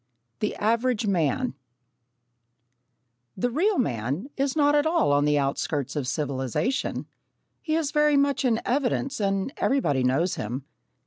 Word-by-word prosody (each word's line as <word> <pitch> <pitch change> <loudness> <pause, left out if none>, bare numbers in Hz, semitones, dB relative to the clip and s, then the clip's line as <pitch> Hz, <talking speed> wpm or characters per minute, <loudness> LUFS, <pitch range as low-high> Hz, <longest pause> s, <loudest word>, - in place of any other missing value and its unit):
The 210 - -1
Average 230 +1 +1
Man 195 - 0 1.8
The 245 +6 0
real 375 - +2
man 140 - -2
is 275 0 0
not 290 -1 +4
at 295 +1 +3
all 320 - +2
on 145 0 +3
the 150 0 +3
outskirts 140 0 -1
of 140 -4 -2
civilisation. 140 - -2 0.6
He 310 -1 -1
is 315 -3 0
very 300 -1 +3
much 280 -2 +2
in 235 -3 +2
evidence 270 0 0
and 195 +5 -1
everybody 145 - +1
knows 140 +8 +1
him. 125 +6 -4
225 Hz, 135 wpm, -26 LUFS, -, 1.8 s, not